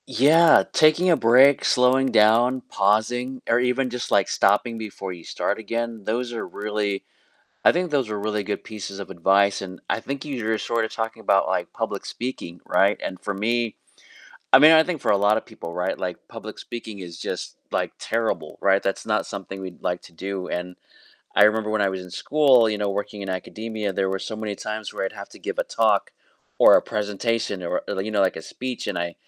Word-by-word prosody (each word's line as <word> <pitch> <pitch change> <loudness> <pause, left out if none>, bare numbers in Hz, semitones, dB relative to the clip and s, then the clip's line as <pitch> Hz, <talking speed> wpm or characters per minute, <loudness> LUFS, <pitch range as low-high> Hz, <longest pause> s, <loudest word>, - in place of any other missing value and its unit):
Yeah. 160 +4 +5
Taking 155 +4 +4
a 170 - +6
break, 130 +4 +5
slowing 130 +1 +3
down, 115 +4 +4
pausing, 120 +6 0
or 115 - +3
even 125 +1 +1
just 125 0 -5
like 100 -2 +3
stopping 115 +4 +2
before 100 -3 -6
you 85 -2 -12
start - - -2
again, 115 0 -4
those 120 +3 -2
are 115 - -4
really 105 -1 -3 0.6
I - - +8
think 175 0 -1
those 135 -6 0
are 105 -1 -3
really 105 0 -2
good 105 +1 -4
pieces 100 -2 -7
of 100 - -7
advice, 95 +2 +2
and 95 -1 -8
I - - +1
think 135 +4 -5
you're 115 -7 -2
sort 115 +1 -1
of - - -8
talking 110 0 -4
about, - - +3
like, - - -2
public - - -4
speaking 105 -8 -6
right? 100 +1 +2
And 95 - -5
for 105 - -4
me 115 +3 -1 0.8
I - - +10
mean, 155 +2 +9
I 160 0 +7
think 170 -4 -3
for - - 0
a 100 - +5
lot 100 +2 +3
of 110 - -3
people 110 -7 -9
right 90 - -2
like 90 -1 -3
public - - -9
speaking 110 -4 -8
is 85 -2 -9
just - - -5 0.2
like - - -1
terrible 110 -9 -2
right? 95 0 +3
That's 95 - -2
not - - 0
something 95 0 -7
we'd 95 -2 -9
like 90 0 -2
to - - -15
do 95 +2 -5
and 90 +1 -4 0.6
I 105 - +7
remember 110 0 +2
when 110 -1 +1
I 100 - +3
was 95 -1 -4
in 90 - -12
school 130 - +4
you 105 -1 -2
know, 105 -1 -1
working 100 +1 -4
in 95 - -6
academia, 105 +3 -4
there 95 0 0
were 95 - -1
so 110 - -6
many 110 -1 -4
times 110 +1 -5
where - - -3
I'd - - -5
have - - -9
to - - -14
give - - -5
a - - +1
talk, - - +1 0.5
or - - +8
a - - +2
presentation 105 -1 -2
or 85 - -2
you 95 +3 -3
know 105 -2 +1
like 95 - +1
a 80 - -6
speech, 125 +7 -6
and 85 -3 -3
110 Hz, 210 wpm, -23 LUFS, 95-120 Hz, 0.8 s, I